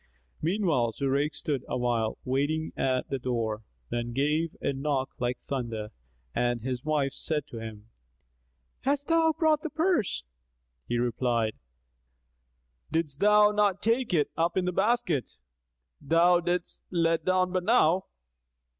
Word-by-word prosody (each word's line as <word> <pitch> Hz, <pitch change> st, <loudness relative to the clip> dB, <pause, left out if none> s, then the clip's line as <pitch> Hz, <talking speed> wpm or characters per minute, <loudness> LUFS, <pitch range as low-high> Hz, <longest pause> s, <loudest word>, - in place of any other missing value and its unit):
Meanwhile 160 Hz, -, +1 dB
Zurayk 140 Hz, +4 st, 0 dB
stood 140 Hz, -4 st, -2 dB
awhile, 120 Hz, -3 st, 0 dB
waiting 145 Hz, +5 st, 0 dB
at 130 Hz, -1 st, 0 dB
the 135 Hz, -, -1 dB
door, 115 Hz, -4 st, -2 dB, 0.3 s
then 120 Hz, 0 st, -2 dB
gave 150 Hz, +5 st, 0 dB
a 140 Hz, -, -1 dB
knock 135 Hz, -1 st, -1 dB
like 125 Hz, +1 st, -1 dB
thunder 115 Hz, -5 st, -4 dB, 0.4 s
and 120 Hz, -1 st, 0 dB
his 125 Hz, 0 st, -3 dB
wife 145 Hz, -3 st, 0 dB
said 150 Hz, -2 st, -2 dB
to 115 Hz, -, -7 dB
him, 110 Hz, -1 st, -8 dB, 0.9 s
"Hast 285 Hz, +2 st, -1 dB
thou 330 Hz, -1 st, +4 dB
brought 310 Hz, -1 st, +2 dB
the 320 Hz, -, -3 dB
purse?" 315 Hz, -, +1 dB, 0.6 s
He 120 Hz, -, 0 dB
replied, 120 Hz, -2 st, 0 dB, 1.4 s
"Didst 150 Hz, -4 st, -1 dB
thou 210 Hz, 0 st, +6 dB
not 205 Hz, -2 st, +1 dB
take 230 Hz, +3 st, +1 dB
it 155 Hz, -5 st, +2 dB
up 170 Hz, +2 st, 0 dB
in 185 Hz, -, +2 dB
the 180 Hz, -, +1 dB
basket 210 Hz, -, 0 dB, 0.6 s
thou 170 Hz, +2 st, +4 dB
diddest 175 Hz, 0 st, -2 dB
let 165 Hz, -2 st, +1 dB
down 185 Hz, 0 st, +2 dB
but 185 Hz, -1 st, 0 dB
now?" 190 Hz, -5 st, +4 dB
150 Hz, 135 wpm, -28 LUFS, 125-185 Hz, 1.4 s, thou